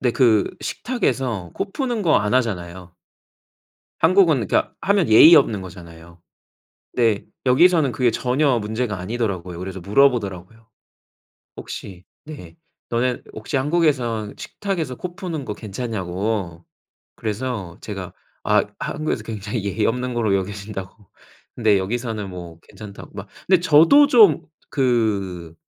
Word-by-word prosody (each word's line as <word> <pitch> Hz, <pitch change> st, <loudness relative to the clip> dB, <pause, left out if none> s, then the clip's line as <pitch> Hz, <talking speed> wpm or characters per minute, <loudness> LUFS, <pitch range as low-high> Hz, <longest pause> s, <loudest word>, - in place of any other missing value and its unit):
네. 125 Hz, -, +2 dB
그 110 Hz, -6 st, +4 dB, 0.2 s
식탁에서 130 Hz, -, -2 dB
코 195 Hz, -, -4 dB
푸는 245 Hz, -6 st, -2 dB
거 165 Hz, -5 st, +4 dB
안 105 Hz, +3 st, -1 dB
하잖아요. 90 Hz, -7 st, -2 dB, 1.1 s
한국은 170 Hz, -3 st, +4 dB
그니까 -, -, +1 dB
하면 195 Hz, -, +2 dB
예의 160 Hz, +10 st, +9 dB
없는 110 Hz, -9 st, +3 dB
거잖아요. 85 Hz, -2 st, -12 dB, 0.7 s
근데 115 Hz, -4 st, +1 dB, 0.2 s
여기서는 155 Hz, +1 st, +4 dB
그게 120 Hz, +1 st, +2 dB
전혀 130 Hz, +2 st, +1 dB
문제가 110 Hz, -1 st, -3 dB
아니더라고요. 95 Hz, -4 st, -3 dB
그래서 95 Hz, +1 st, -6 dB
물어보더라고요. 110 Hz, -1 st, 0 dB, 0.9 s
혹시 90 Hz, -3 st, -9 dB, 0.2 s
네. 115 Hz, -, -10 dB, 0.3 s
너네 120 Hz, +1 st, 0 dB
혹시 110 Hz, +6 st, -3 dB
한국에선 130 Hz, -8 st, 0 dB
식탁에서 170 Hz, -10 st, -4 dB
코 175 Hz, +4 st, -7 dB
푸는 170 Hz, -7 st, -5 dB
거 -, -, -4 dB
괜찮냐고. 100 Hz, -4 st, -4 dB, 0.5 s
그래서 110 Hz, -5 st, -4 dB
제가 -, -, -7 dB, 0.3 s
아 -, -, +3 dB
한국에서 155 Hz, -7 st, -3 dB
굉장히 110 Hz, 0 st, -5 dB
예의 105 Hz, +2 st, 0 dB
없는 125 Hz, +1 st, -2 dB
거로 110 Hz, -4 st, +1 dB
여겨진다고. 100 Hz, 0 st, -6 dB, 0.4 s
그런데 110 Hz, -4 st, +3 dB
여기서는 110 Hz, 0 st, -3 dB
뭐 85 Hz, -2 st, -9 dB
괜찮다고 105 Hz, -2 st, -12 dB
막. 95 Hz, 0 st, -8 dB, 0.2 s
그런데 185 Hz, -1 st, +4 dB
저도 165 Hz, -, +6 dB
좀 220 Hz, -, +5 dB, 0.3 s
그 100 Hz, -, -1 dB
115 Hz, 295 characters per minute, -21 LUFS, 95-140 Hz, 1.1 s, 예의